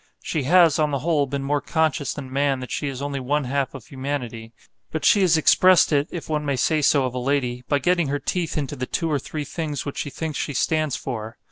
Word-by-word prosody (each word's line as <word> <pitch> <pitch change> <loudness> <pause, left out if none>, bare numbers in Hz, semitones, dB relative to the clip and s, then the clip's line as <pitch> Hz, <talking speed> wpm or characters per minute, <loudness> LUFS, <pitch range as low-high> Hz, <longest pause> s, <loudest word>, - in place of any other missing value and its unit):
She 155 - -1
has, 170 0 +5
on 150 -1 +2
the 140 - -1
whole, 150 -4 +2
been 140 +1 -3
more 145 +1 0
conscious 155 -3 0
than 130 -3 -7
man 140 -1 +1
that 125 - -7
she 145 - -2
is 135 0 -4
only 140 -1 -3
one 145 +3 0
half 135 +1 -2
of 125 -5 -9
humanity; 130 -5 -5 0.4
but 160 - -3
she 205 - +5
has 175 -4 +4
expressed 185 +3 +5
it 145 0 +2
(if 175 - -6
one 150 -1 -1
may 140 -2 0
say 155 +4 +1
so 140 -1 +3
of 125 - -3
a 125 - -3
lady) 125 -2 -1
by 145 - +2
getting 170 +3 +1
her 145 +1 0
teeth 170 +2 -2
into 145 -1 -2
the 130 -2 -4
two 165 -2 -1
or 145 - +1
three 150 +2 -5
things 150 -2 -4
which 140 - -5
she 145 - -3
thinks 155 +1 -4
she 145 - -3
stands 155 +1 +1
for. 110 -4 -6
145 Hz, 245 wpm, -23 LUFS, 135-155 Hz, 0.4 s, has